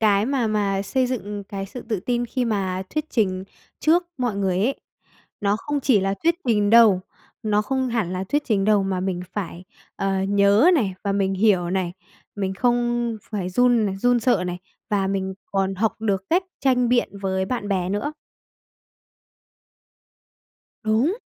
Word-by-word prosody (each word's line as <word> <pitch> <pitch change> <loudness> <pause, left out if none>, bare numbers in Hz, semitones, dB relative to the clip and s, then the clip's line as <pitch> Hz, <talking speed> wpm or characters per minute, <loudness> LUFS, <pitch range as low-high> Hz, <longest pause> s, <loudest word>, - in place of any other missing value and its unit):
cái 210 -1 +3
mà 260 -4 +1
mà 200 -2 0
xây 255 +5 0
dựng 205 -5 -4
cái 195 -1 -5
sự 245 +5 -8
tự 215 -5 -1
tin 240 +3 -1
khi 250 +2 -1
mà 190 -5 -1
thuyết 305 - -1
trình 185 -5 0 0.4
trước 335 +3 +4 0.2
mọi 240 -5 -1
người 190 -2 0
ấy 245 +8 0 0.6
nó 205 0 +2
không 290 +4 -3
chỉ 250 -6 +3
là 195 +1 0
thuyết 335 0 +3
trình 210 -3 +3
đâu, 225 -5 +7 0.4
nó 210 -1 +2
không 260 +2 -1
hẳn 225 -7 -1
là 185 +1 -2
thuyết 290 +9 0
trình 200 -5 +1
đâu, 210 -1 +4
mà 190 -1 -1
mình 185 -1 -2
phải, 180 -3 -5 0.3
ờ, 195 -1 0
nhớ 200 - +4
này 205 - +1
và 200 - +1
mình 195 -1 +1
hiểu 190 -4 +2
này, 185 -2 -1 0.4
mình 190 -1 -2
không 240 0 +1
phải 195 -4 -2
run 240 +1 +3
này 195 -1 -2
run 245 +3 +2
sợ 225 -6 +2
này 180 0 -4 0.3
và 195 -2 +1
mình 190 -1 -2 0.2
còn 195 0 0
học 215 +3 0
được 200 -4 0
cách 360 +3 +3 0.2
tranh 250 -2 +2
biện 245 0 +2
với 190 -1 -1
bạn 205 -1 -3
bè 185 -2 0
nữa. 205 +10 -2 2.7
Đúng. 230 - +2
205 Hz, 175 wpm, -23 LUFS, 195-240 Hz, 2.7 s, đâu